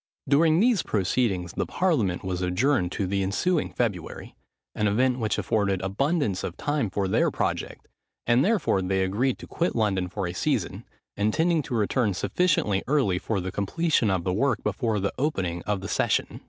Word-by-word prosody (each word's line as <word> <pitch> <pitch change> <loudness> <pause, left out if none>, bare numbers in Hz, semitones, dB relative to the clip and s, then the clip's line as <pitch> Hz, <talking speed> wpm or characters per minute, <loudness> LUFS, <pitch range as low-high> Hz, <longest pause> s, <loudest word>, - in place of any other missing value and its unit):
During 155 +4 +4
these 230 -3 +3
proceedings 95 -3 0
the - - -2
parliament 140 - 0
was 90 -1 -3
adjourned 90 +2 +1
to 100 - -1
the 100 +1 -1
ensuing 105 - 0
February, 100 -9 -3 0.4
an 105 - 0
event 125 +5 +2
which 110 -2 0
afforded 100 -3 0
abundance 110 - 0
of 90 - -5
time 145 -7 -1
for 95 +1 -1
their 95 - +2
project; - - -3 0.4
and 120 +3 +4
therefore 190 - +2
they 95 +1 0
agreed 115 +8 0
to - - -10
quit 170 - -2
London 100 -5 +1
for 100 +1 -3
a 85 - -4
season, - - -2 0.3
intending 160 +11 +1
to 130 - -5
return 110 -1 +1
sufficiently 130 - +1
early 130 -11 +2
for 110 0 -2
the 95 0 -4
completion 115 - +1
of 95 -3 0
the 90 0 -1
work 125 +4 0
before 115 -5 -1
the 100 +1 -1
opening 95 - -1
of 105 -2 -1
the 100 - -5
session. - - 0
105 Hz, 175 wpm, -26 LUFS, 95-140 Hz, 0.4 s, During